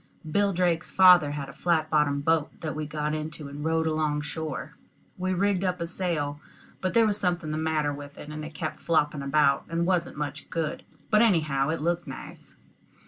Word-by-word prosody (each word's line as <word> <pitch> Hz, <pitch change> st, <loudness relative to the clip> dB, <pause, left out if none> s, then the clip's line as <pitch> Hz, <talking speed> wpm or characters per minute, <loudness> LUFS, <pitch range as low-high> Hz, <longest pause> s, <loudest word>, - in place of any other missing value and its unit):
Bill 200 Hz, +5 st, +2 dB
Drake's 175 Hz, -2 st, +1 dB
father 180 Hz, -5 st, +7 dB
had 140 Hz, -2 st, -4 dB
a 140 Hz, -, -10 dB
flat 160 Hz, -3 st, 0 dB
bottomed 145 Hz, -2 st, +2 dB
boat 160 Hz, -2 st, +1 dB
that 155 Hz, -2 st, -3 dB
we 155 Hz, -1 st, -3 dB
got 150 Hz, 0 st, -2 dB
into 155 Hz, -1 st, -5 dB
and 145 Hz, +1 st, -7 dB
rowed 160 Hz, 0 st, +1 dB
along 155 Hz, -2 st, 0 dB
shore. 155 Hz, -2 st, -5 dB, 0.4 s
We 185 Hz, 0 st, -2 dB
rigged 195 Hz, 0 st, +1 dB
up 180 Hz, -1 st, 0 dB
a 170 Hz, -, -2 dB
sail; 165 Hz, -5 st, -2 dB, 0.4 s
but 185 Hz, +3 st, -1 dB
there 230 Hz, -1 st, +6 dB
was 210 Hz, -1 st, +1 dB
something 175 Hz, -5 st, -1 dB
the 155 Hz, -, -2 dB
matter 155 Hz, -2 st, 0 dB
with 145 Hz, 0 st, -9 dB
it, 145 Hz, -, -9 dB
and 155 Hz, 0 st, -6 dB
it 155 Hz, 0 st, -8 dB
kept 155 Hz, -, -4 dB
flopping 150 Hz, -3 st, +1 dB
about, 140 Hz, 0 st, +2 dB
and 165 Hz, +1 st, 0 dB
wasn't 175 Hz, -4 st, 0 dB
much 145 Hz, -1 st, -5 dB
good, 165 Hz, -2 st, -2 dB, 0.3 s
but 215 Hz, 0 st, +6 dB
anyhow 155 Hz, -10 st, +2 dB
it 160 Hz, -2 st, -1 dB
looked 170 Hz, 0 st, 0 dB
nice. 135 Hz, -, -10 dB
155 Hz, 195 wpm, -27 LUFS, 150-175 Hz, 0.4 s, father